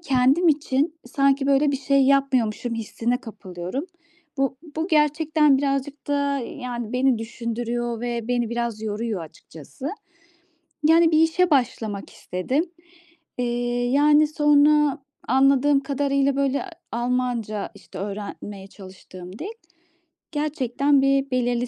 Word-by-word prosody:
kendim 275 Hz, +3 st, +3 dB
için 295 Hz, +1 st, +1 dB
sanki, 275 Hz, +1 st, +2 dB
böyle, 280 Hz, +1 st, +3 dB
bir 275 Hz, -, 0 dB
şey 275 Hz, 0 st, +2 dB
yapmıyormuşum 255 Hz, -4 st, +1 dB
hissine 230 Hz, +2 st, -2 dB
kapılıyorum. 200 Hz, -, -6 dB, 0.5 s
Bu 270 Hz, -1 st, 0 dB, 0.2 s
bu 325 Hz, +3 st, -1 dB
gerçekten 300 Hz, -1 st, +3 dB
birazcık 275 Hz, +1 st, -2 dB
da, 285 Hz, -1 st, +1 dB
yani, 245 Hz, -4 st, -5 dB
beni 255 Hz, -2 st, +2 dB
düşündürüyor 235 Hz, +1 st, -3 dB
ve 235 Hz, -1 st, -3 dB
beni 240 Hz, -2 st, 0 dB
biraz 235 Hz, -2 st, -3 dB
yoruyor 215 Hz, -2 st, -3 dB
açıkçası. 160 Hz, -, -10 dB, 1.0 s
Yani, 330 Hz, 0 st, +5 dB
bir 310 Hz, -, +4 dB
işe 345 Hz, +2 st, +2 dB
başlamak 220 Hz, -6 st, 0 dB
istedim. 255 Hz, -, -2 dB, 0.7 s
Eee, 250 Hz, -, 0 dB, 0.5 s
yani, 295 Hz, +2 st, +5 dB
sonra 295 Hz, -1 st, +4 dB, 0.3 s
anladığım 275 Hz, +2 st, +4 dB
kadarıyla, 275 Hz, -1 st, 0 dB
böyle 280 Hz, +1 st, +1 dB, 0.3 s
Almanca, 240 Hz, -3 st, -2 dB
işte, -, -, -12 dB
öğrenmeye 200 Hz, 0 st, -6 dB
çalıştığım 185 Hz, -1 st, -12 dB
dil. 345 Hz, -, -5 dB, 0.9 s
Gerçekten, 285 Hz, -2 st, +1 dB
bir 275 Hz, 0 st, +2 dB
belirli 245 Hz, -1 st, 0 dB
265 Hz, 115 wpm, -23 LUFS, 235-285 Hz, 1.0 s, Yani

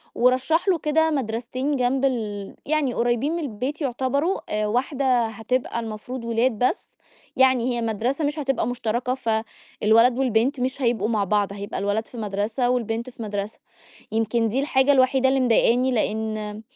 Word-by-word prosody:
ورشّح 260 Hz, +9 st, +2 dB
له 370 Hz, -3 st, +4 dB
كده 320 Hz, +1 st, +1 dB
مدرستين 255 Hz, +1 st, -2 dB
جنب 260 Hz, +1 st, +1 dB
ال 210 Hz, -6 st, -3 dB
يعني 290 Hz, -4 st, 0 dB
قريبين 240 Hz, +5 st, 0 dB
من -, -, -2 dB
البيت 275 Hz, +2 st, -4 dB
يعتبروا، 260 Hz, -, -1 dB
واحدة 255 Hz, +1 st, +1 dB
هتبقى 225 Hz, +3 st, -2 dB
المفروض 230 Hz, +3 st, -6 dB
وِلاد 235 Hz, +2 st, +2 dB
بس، 250 Hz, +10 st, 0 dB, 0.4 s
يعني 255 Hz, -2 st, +3 dB
هي 235 Hz, -, -2 dB
مدرسة 235 Hz, +7 st, -1 dB
مش 295 Hz, +2 st, -2 dB
هتبقى 270 Hz, -5 st, 0 dB
مشتركة، 245 Hz, +1 st, -1 dB
فالولد 225 Hz, 0 st, +1 dB
والبنت 255 Hz, +2 st, +1 dB
مش 260 Hz, +2 st, -2 dB
هيبقوا 230 Hz, -3 st, +1 dB
مع 215 Hz, -3 st, +1 dB
بعض 200 Hz, 0 st, 0 dB
هيبقى 200 Hz, 0 st, -5 dB
الولد 205 Hz, +3 st, -1 dB
في 245 Hz, -, -12 dB
مدرسة 215 Hz, +4 st, -1 dB
والبنت 235 Hz, 0 st, -1 dB
في 235 Hz, -, -9 dB
مدرسة، 205 Hz, 0 st, -4 dB, 0.5 s
يمكن 225 Hz, +1 st, +1 dB
دي 250 Hz, +5 st, 0 dB
الحاجة 275 Hz, -1 st, +3 dB
الوحيدة 265 Hz, -1 st, +4 dB
اللي 270 Hz, 0 st, +2 dB
مضايقني، 250 Hz, +1 st, +3 dB
لإن 215 Hz, -2 st, -2 dB
245 Hz, 150 wpm, -23 LUFS, 220-265 Hz, 0.5 s, له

